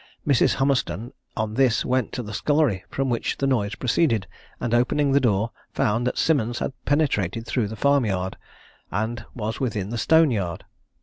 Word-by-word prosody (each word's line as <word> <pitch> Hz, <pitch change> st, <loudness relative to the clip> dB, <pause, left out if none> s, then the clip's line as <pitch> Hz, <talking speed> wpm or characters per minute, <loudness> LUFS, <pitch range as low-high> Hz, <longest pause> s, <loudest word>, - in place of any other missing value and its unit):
Mrs. 140 Hz, -4 st, +4 dB
Hummerstone 125 Hz, -5 st, 0 dB, 0.3 s
on 110 Hz, -1 st, -1 dB
this 125 Hz, -1 st, +2 dB
went 130 Hz, -2 st, 0 dB
to 125 Hz, -, -3 dB
the 105 Hz, -1 st, -7 dB
scullery, 145 Hz, -, +1 dB
from 135 Hz, 0 st, -1 dB
which 115 Hz, -, -1 dB
the 140 Hz, -, -1 dB
noise 105 Hz, -6 st, +1 dB
proceeded, 115 Hz, -, +1 dB, 0.3 s
and 120 Hz, -, -2 dB
opening 135 Hz, +4 st, +2 dB
the 140 Hz, -, +5 dB
door, 115 Hz, -3 st, +1 dB, 0.2 s
found 115 Hz, +4 st, +1 dB
that -, -, -2 dB
Simmons 120 Hz, -7 st, +1 dB
had -, -, -2 dB
penetrated 115 Hz, -, +1 dB
through 120 Hz, -3 st, 0 dB
the 110 Hz, -, -6 dB
farm 140 Hz, +1 st, +3 dB
yard, 95 Hz, -1 st, -2 dB, 0.5 s
and 110 Hz, +3 st, -2 dB
was 110 Hz, -1 st, -3 dB
within 105 Hz, -6 st, -2 dB
the 120 Hz, -, -2 dB
stone 160 Hz, +4 st, +5 dB
yard. 90 Hz, -7 st, -3 dB
120 Hz, 175 wpm, -24 LUFS, 105-135 Hz, 0.5 s, the